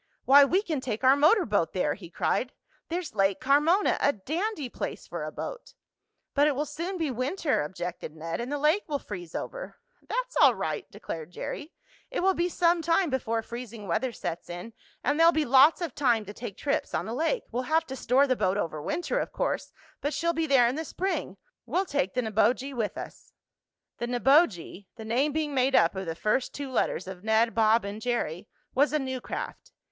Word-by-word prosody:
why, 280 +1 +8
we 365 +8 +2
can 310 -9 -2
take 240 -2 -4
our 260 +1 +7
motor 320 +8 +4
boat 205 -6 0
there!" 180 -6 +1
he 175 -5 -11
cried. 250 +8 -1 0.4
"There's 340 -5 -3
Lake 195 -2 +2
Carmona 300 +9 +3
a 285 - +4
dandy 310 - -3
place - - -5
for - - -5
a - - -4
boat." - - -7 0.6
"But 290 +1 +4
it 295 - +1
will 295 +3 -1
soon 335 +6 -4
be 320 -5 -1
winter," 265 - 0
objected 175 0 -5
Ned, 165 +5 -4
"and 245 +3 -5
the 290 - 0
lake 305 +7 +3
will 295 -3 -1
freeze 175 - -8
over." - - -6 0.3
"That's - - -2
all - - +6
right," - - -3
declared 160 -1 -7
Jerry. 295 - -6 0.4
"It - - -2
will 385 +1 +4
be 350 0 0
some 345 0 +2
time 330 0 +2
before 230 -3 -1
freezing 230 -3 -8
weather 245 +9 0
sets 175 -6 -5
in, 175 +6 -7 0.3
and 290 +2 +1
there'll 330 +1 +7
be 315 -2 +1
lots 275 +7 +6
of 330 -7 -3
time 240 -6 +2
to 205 - -8
take 215 -3 -7
trips 285 - -1
on - - -1
the 225 - -4
lake. 330 - 0
We'll 245 +2 -1
have 320 +1 +3
to 265 - -6
store 265 +2 +3
the 260 -2 +1
boat 190 -4 +1
over 155 -6 -2
winter, 345 - -1
of - - -3
course, - - -2 0.3
but 290 +2 -1
she'll 335 0 +1
be 325 0 -1
there 265 -4 +5
in 240 - 0
the 320 - -2
spring. 340 - -3 0.3
We'll 355 +10 +1
take 280 - -1
the 250 - +1
Neboje 240 +5 +1
with 230 -5 -2
us." - - -9 0.7
The 240 - -2
Neboje 240 - +2
(the 220 - -9
name 255 +7 +1
being 300 -1 -2
made 265 0 +2
up 170 - +5
of 190 -1 -4
the 165 - -3
first 215 +8 0
two 280 -2 -5
letters 185 - 0
of 190 -1 -8
Ned, 220 +1 +3
Bob 220 0 +3
and 205 +2 -6
Jerry) 215 -7 -2 0.3
was 285 +3 +3
a - - +4
new 260 -3 -3
craft. - - -6
260 Hz, 210 wpm, -28 LUFS, 215-310 Hz, 0.7 s, why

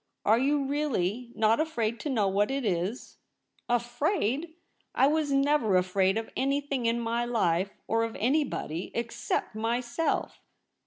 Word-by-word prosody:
Are 220 +3 +5
you 280 +2 +2
really 250 -6 -1
not 220 +1 +3
afraid 235 -8 -1
to 300 - -4
know 220 -7 +2
what 200 +2 +1
it 270 -2 -2
is 190 +4 -2 0.2
?' - - -53
* - - -38
Afraid! 280 - -1 0.4
I - - +5
was 300 0 +1
never 275 -8 +3
afraid 185 +2 +2
of 225 - -4
anything 275 -2 0
in 230 +1 +1
my 235 +1 -1
life, 200 -5 0
or 225 +1 +1
of 230 0 -3
anybody, 245 - -1
except 235 -2 -2
myself. 240 +7 -1
235 Hz, 150 wpm, -28 LUFS, 215-275 Hz, 0.4 s, Are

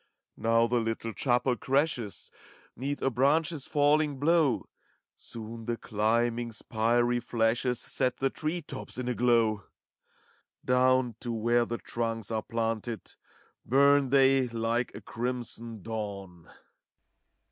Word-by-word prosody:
Now 115 +1 +3
the 120 +1 +1
little 115 0 -3
chapel 125 +1 +1
crashes 135 -6 -1 0.4
'Neath 140 +4 -3
a 135 - +2
branch's 145 +4 +1
falling 145 0 +2
blow; 155 -2 +2 0.5
Soon 115 0 -8
the 120 0 -2
climbing, 115 +2 0
spiry 120 +3 +1
flashes 120 +1 0
Set 130 -2 -1
the 135 0 0
tree 160 +2 -3
tops 135 -4 -8
in 125 -1 -3
a 125 - +1
glow. 115 -5 +2 1.0
Down 125 -2 +3
to 120 - -4
where 120 +1 +2
the 120 0 -3
trunks 115 -3 -3
are 110 -1 0
planted 115 -2 -2
ACT - - -14 0.5
V, - - -23
233 140 +3 +6
Bum 135 -2 -3
they 135 -1 +4
like 115 +1 -1
a - - -8
crimson 115 -3 -4
dawn. 100 -6 -6
120 Hz, 130 wpm, -29 LUFS, 115-130 Hz, 1.0 s, 233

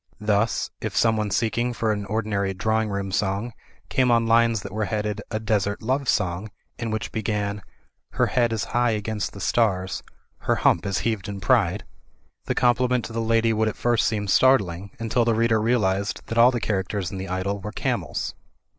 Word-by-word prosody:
Thus, 105 +1 0
if - - -3
someone 110 -2 +2
seeking 115 +4 0
for 115 -2 0
an 105 -2 -3
ordinary 105 -3 -1
drawing 110 +3 0
room 100 -1 -3
song 100 +4 -1 0.3
came 130 -1 +2
on 115 -1 +4
lines 115 -2 +3
that - - -7
were 110 +1 -1
headed 105 0 -2
"A 110 - -2
Desert 105 -1 -1
Love 130 +3 0
Song,'* 90 +4 0 0.3
and 115 -2 -3
which 110 -1 -3
began 105 -2 -2 0.3
— - - -49
*Hler - - +2
head 120 -2 +2
is 110 -1 -1
high 120 0 +3
against 105 -1 -3
the 100 - -9
stars. 95 -2 0 0.4
Her - - +1
hump 85 +4 +2
is 100 -2 0
heaved 110 -5 -1
in 100 -1 -5
pride," 100 -2 +2 0.6
the - - -1
compliment 125 0 +2
to 115 - -8
the 115 - -1
lady 115 0 +2
would 110 0 +1
at 110 - -2
first 120 -2 +2
seem 105 -2 -1
start 130 +6 +5
ling, 90 +1 -7
until 115 +1 +1
the 115 -1 +2
reader 115 -1 +2
realised 105 -4 0
that 115 +1 -5
all 120 +1 +8
the 125 -2 -1
characters 100 -3 -2
in 95 - -5
the 95 0 -5
idyll 95 +2 -2
were 105 +2 -5
camels. - - -2
110 Hz, 195 wpm, -24 LUFS, 100-115 Hz, 0.6 s, all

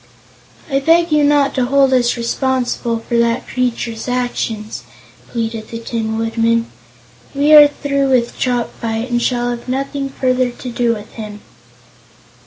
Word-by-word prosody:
"I 275 -3 +1
beg 330 +3 +3
you 300 -1 +4
not 285 -1 +3
to 255 -2 +1
hold 275 0 +3
us 245 -1 +2
responsible 240 -1 -1
for 235 - 0
that 235 +1 0
creature's 235 -2 -2
actions," 245 -3 -3 0.5
pleaded 225 -2 -3
the 230 - -5
Tin 225 -1 -3
Woodman. 230 0 +1 0.7
"We 290 +2 +4
are 295 -1 +10
through 280 -1 -1
with 245 -3 +1
Chopfyt 235 -1 -2
and 240 0 +1
shall 245 0 0
have 240 +1 -6
nothing 275 +1 -2
further 255 -1 0
to 245 +1 -8
do 235 -1 +1
with 210 0 -10
him." 210 -2 -8
245 Hz, 145 wpm, -17 LUFS, 230-270 Hz, 0.7 s, are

